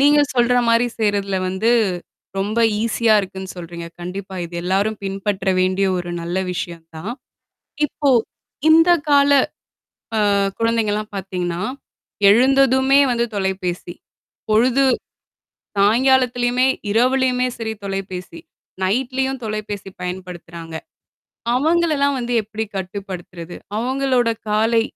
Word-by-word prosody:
நீங்க 290 +1 +6
சொல்றமாரி 240 -1 +3
செய்றதுல 200 -3 0
வந்து 200 +5 +1 0.7
ரொம்ப 210 +4 -1 0.2
ஈசியா 230 -1 +2
இருக்குன்னு 190 0 -7
சொல்றீங்க. 170 -1 -7
கண்டிப்பா. 190 +2 -6
இது 170 +1 -9
எல்லாரும் 200 +4 0
பின்பற்ற 195 0 -2
வேண்டிய 185 +1 +2
ஒரு 175 -1 -4
நல்ல 170 +2 -4 0.2
விஷயம் 170 -2 -5
தான். 200 +9 -5 0.7
இப்போ, 285 0 0 0.6
இந்த 330 +2 +6 0.2
கால 285 0 +5 0.9
அ - - +2 0.4
குழந்தைங்கலாம் 220 -2 0
பாத்தீங்கன்னா, 180 -2 -3 0.7
எழுந்ததுமே 265 +4 +5
வந்து 235 0 +1
தொலைபேசி. 185 -3 -2 0.6
பொழுது 250 +5 +4 0.9
சாய்ங்காலத்திலயுமே, 245 +3 +3 0.2
இரவுலயுமே 255 +2 +2
சரி 220 -1 -3
தொலைபேசி. 190 -3 -5 0.4
நைட்லயும் 265 +5 0
தொலைபேசி 210 -2 -4
பயன்படுத்துறாங்க. 175 -3 -7 0.8
அவங்களெல்லாம் 300 -1 +2
வந்து 245 0 -3
எப்டி 220 +1 -4
கட்டுப்படுத்துறது? 180 -3 -6 0.2
அவுங்களோட 255 0 +1 0.2
காலை 225 +2 +3
215 Hz, 95 wpm, -20 LUFS, 190-250 Hz, 0.9 s, நீங்க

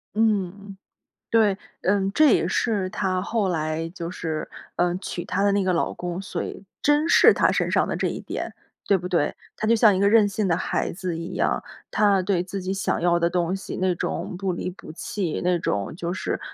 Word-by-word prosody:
嗯， 200 -2 0 0.5
对， 215 -4 +4 0.3
嗯， 195 +1 +2
这 305 -1 +5
也 170 - +1
是 200 -2 0
她 185 -2 -1
后 210 -3 0
来 160 -1 -1
就 170 -1 -6
是， 160 -4 -4 0.2
呃， 175 0 +1
娶 180 -2 -5
她 195 +2 0
的 200 - +4
那 200 0 +2
个 185 -1 +1
老 170 - 0
公， 175 0 -4
所 195 - -4
谓 - - -7 0.2
珍 295 +2 +3
视 - - +7
她 - - +3
身 - - 0
上 - - +3
的 - - -2
这 - - 0
一 - - -4
点， - - -5 0.4
对 200 -2 +4
不 180 - -6
对？ 170 -5 0 0.2
她 215 - -2
就 230 - +5
像 215 -3 +6
一 - - 0
个 200 - +4
任 215 -1 +5
性 200 0 -1
的 165 - +2
孩 185 - -1
子 180 -1 -4
一 165 +1 -6
样， - - 0 0.3
她 205 -2 +4
对 180 -2 +1
自 195 +1 -5
己 185 +1 -2
想 195 - -1
要 170 0 +2
的 170 0 +2
东 175 +1 0
西， 195 - -5
那 185 -1 +2
种 175 - -3
不 190 0 -1
离 175 - -3
不 185 - -10
弃， 180 -1 -3
那 180 0 +3
种 100 -3 -2
就 170 +1 -3
是 170 -3 -3
185 Hz, 230 characters per minute, -24 LUFS, 175-200 Hz, 0.5 s, 视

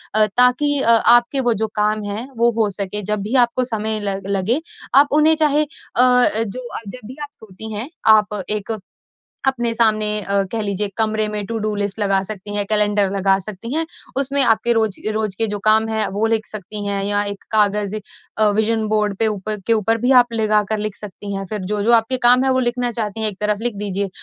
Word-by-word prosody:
अ, 215 0 +5
ताकि 275 +4 +3
अ, 230 - +4
आपके 240 +3 +4
वो 235 - +4
जो 220 - 0
काम 210 0 0
हैं 220 +5 -5
वो 235 +1 +3
हो 210 - +1
सके 200 +1 -2
जब 210 - 0
भी 225 +6 -3
आपको 240 +2 -2
समय 215 0 -2
ल 195 -1 -2
लगे 200 +10 0 0.4
आप 285 - +5
उन्हें 315 +1 +4
चाहे 300 -1 +2
अ, - - -4 0.3
जो 250 -2 +2
आप - - -9
जब 220 +1 -10
भी 255 +4 -11
आप 290 - -8 0.2
सोती 215 +2 -8
हैं 220 +7 -5 0.3
आप 210 -1 -2
एक 215 +1 0 0.7
अपने 240 -3 0
सामने 215 -2 +3 0.2
अ, 200 +1 +1
कह 230 - -2
लीजिए 200 0 -1
कमरे 220 -1 +1
में 210 -1 -3
टू-डू 215 -2 -3
लिस्ट 205 +1 -3
लगा 195 -1 +2
सकती 205 +1 -7
हैं, 205 - +2
कैलेंडर 205 -2 +2
लगा 195 0 +1
सकती 215 +6 -7
हैं 325 +1 0 0.4
उसमें 280 +1 +1
आपके 230 -1 +3
रोज 220 -3 0 0.2
रोज 215 -3 -2
के 225 - +3
जो 205 0 -4
काम 220 +1 +4
हैं 220 -1 0
वो 210 +3 -1
लिख 225 -1 -1
सकती 210 0 -6
हैं 200 -1 -1
या 205 0 +1
एक 200 -1 -5
कागज 210 -1 +2 0.4
अ, 215 -1 +4
विज़न 220 0 0
बोर्ड 210 -2 0
पे 225 - +3
ऊपर 215 0 -1
के 230 - +2
ऊपर 225 +1 +1
भी 245 +3 0
आप 245 -1 -2
लगाकर 215 -1 0
लिख 210 -1 -4
सकती 200 0 -8
हैं। 195 - -4
फिर 210 -2 -3
जो-जो 210 +3 +1
आपके 230 +2 +4
काम 250 +1 +6
हैं 265 - +1
वो 260 0 +1
लिखना 245 0 0
चाहती 220 -1 -4
हैं 215 - +3
एक 190 - -15
तरफ 210 -1 0
लिख 240 -3 -1
दीजिए, 200 -1 -3
215 Hz, 215 wpm, -19 LUFS, 205-235 Hz, 0.7 s, काम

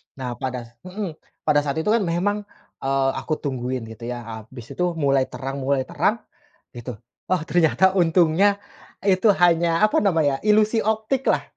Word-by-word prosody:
Nah, 130 -2 -5
pada 130 -2 -3
s 115 - -16 0.2
mhm, 195 -1 -4 0.3
pada 150 -1 +3
saat 145 -1 -2
itu 210 - +1
kan 230 - +4
memang, 205 +3 -1 0.3
eee, 135 0 +1
aku 155 - -2
tungguin, 130 -4 -3
gitu 115 +1 -9
ya, 120 -1 -5 0.2
abis 120 0 -12
itu 180 -1 -1
mulai 140 -4 +2
terang 135 +1 -6
mulai 135 0 0
terang, - - -1 0.5
gitu. 120 0 -7 0.3
Oh, 185 -3 +1
ternyata, 165 +1 +3
untungnya 175 +3 +4 0.5
itu 195 +1 +3 0.2
hanya, 170 0 +3
apa 215 - +4
namanya 160 -9 +1
ya, 210 0 +3
ilusi 215 +1 +3
optiklah, 220 +5 0
160 Hz, 160 wpm, -23 LUFS, 130-195 Hz, 0.5 s, kan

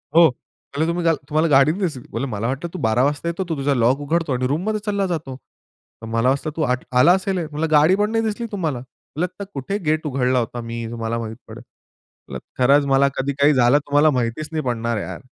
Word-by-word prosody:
हो 170 0 +8
म्हणले, 140 +4 -6
तुम्ही 170 0 -1 0.2
तुम्हाला 155 +2 +2
गाडी 140 +1 +5
नाही 190 +6 -5
दिसली? 130 -6 -3
"मला 110 -2 -3
वाटतं 135 +6 -3
तू 185 - -5
12:00 110 +2 +2
वाजता 145 +4 -1
येतो 170 +3 -2
तू 160 - -2
तुझा 140 +1 +1
लॉक 125 +2 +2
उघडतो 160 0 -1
आणि 125 0 0
रूममध्ये 185 +10 -1
चालला 200 -2 0
जातो. 155 -7 -4 0.7
तर - - -8
मला 115 +2 +2
वाटतं 140 +3 0
तू - - -1 0.4
आला 125 +8 +6
असेल." 190 0 -1
म्हणलं, 155 +1 -3
"गाडी 155 +4 +5
पण 210 +2 0
नाही 225 0 +1
दिसली 220 +2 -2
तुम्हाला. 160 - -2
म्हणलं 140 +6 -6
आता - - -3
कुठे 140 +9 -3
गेट 155 +1 0
उघडला 130 -2 +1
होता 120 +1 -4
मी 115 0 -5
तुम्हाला 115 0 -3
माहीत 110 -1 -6
पडलं. - - -10 0.7
म्हंटलं - - -5 0.2
खरंच 140 +3 +5
मला 135 0 +4
कधी 140 +1 -1
काही 145 +2 +5
झालं 125 +1 +4
तुम्हाला 145 +2 +4
माहितीच 120 +6 -3
नाही 155 -1 -2
पडणार 115 -2 -1
यार." - - -6
145 Hz, 210 wpm, -21 LUFS, 125-165 Hz, 0.7 s, हो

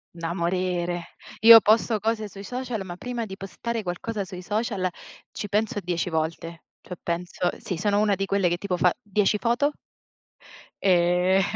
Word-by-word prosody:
Da 165 0 -3
morire. 175 -1 -1 0.4
Io 225 0 +11
posto 220 +1 +3
cose 220 0 -1
sui 200 0 -10
social, 245 -1 -4
ma 175 -2 -8
prima 240 +2 -4
di 190 0 -8
postare 225 +3 -4
qualcosa 200 +3 -3
sui 180 -1 -8
social, 205 -2 -1 0.4
ci 205 - -5
penso 210 0 0
10 175 0 -2
volte. 165 +1 -3 0.2
Cioè, 180 - -8
penso 175 +1 -2
sì, 180 - -4
sono 205 +2 +1
una 210 -2 +3
di 195 - -2
quelle 195 -2 +1
che, 175 - 0
tipo, 190 -1 -2
fa 180 0 +4
10 210 0 +1
foto 240 +8 +1 1.1
Eh, 180 +1 +3
195 Hz, 160 wpm, -25 LUFS, 175-215 Hz, 1.1 s, Io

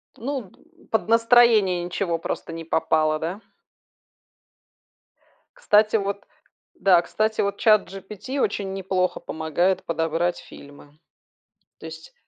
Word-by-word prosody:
Ну, 255 -4 -5
д 335 +1 -25
под 220 -1 0
настроение 230 -6 +4
ничего 175 -1 -2
просто 165 0 -5
не 165 0 -6
попало, 155 -1 +1
да? 175 +7 -5 2.2
Кстати, 215 - +3
вот 200 -1 -2 0.5
Да, 180 -3 +4
кстати, 215 +4 -1
вот 200 0 -2
ChatGPT 215 +3 0
очень 195 -6 -1
неплохо 185 -1 -1
помогает 160 +4 -1
подобрать 165 +1 -1
фильмы. 145 +1 -15 0.8
То 160 - -10
есть 160 0 -11
190 Hz, 110 wpm, -23 LUFS, 165-215 Hz, 2.2 s, настроение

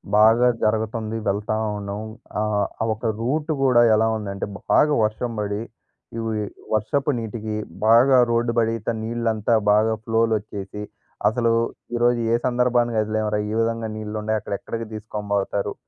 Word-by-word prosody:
బాగా 115 +3 +6 0.2
జరుగతుంది 110 +1 -1
వెళ్తా 105 +2 0 0.2
ఉన్నాం. 100 +1 -5 0.4
ఆహ్, 105 -1 +1 0.2
ఆ - - +2
ఒక 110 +1 -3
రూట్ 150 +7 -1
కూడా 125 -3 +5
ఎలా 110 +1 +3
ఉందంటే, 100 -2 -4 0.3
బాగా 150 0 +5
వర్షం 110 +3 -1
పడి 105 0 -2 0.6
ఉవి 110 -1 -2 0.3
వర్షపు 135 +7 +1
నీటికి 110 -1 -4 0.3
బాగా 120 +4 +6
రోడ్డు 115 0 +1
బడీత 115 -1 0 0.2
నీళ్ళంతా 115 -1 0 0.2
బాగా 110 +1 +3
ఫ్లోలోచ్చేసి. 110 -3 -1 0.5
అసలు 115 +1 +2 0.4
ఈరోజు 120 0 +2
ఏ - - +5
సందర్భాన 120 -1 +2
కదిలాంరా! 110 0 0
ఈ - - -2
విధంగా 115 0 -1
నీళ్లు 110 0 -6
ఉండాయి. 110 0 0
అక్కడ - - -5
ఎక్కడికి 115 -1 -5
తీసుకొని 105 -1 -6
పోతారు? 100 0 -1
110 Hz, 135 wpm, -23 LUFS, 105-115 Hz, 0.6 s, బాగా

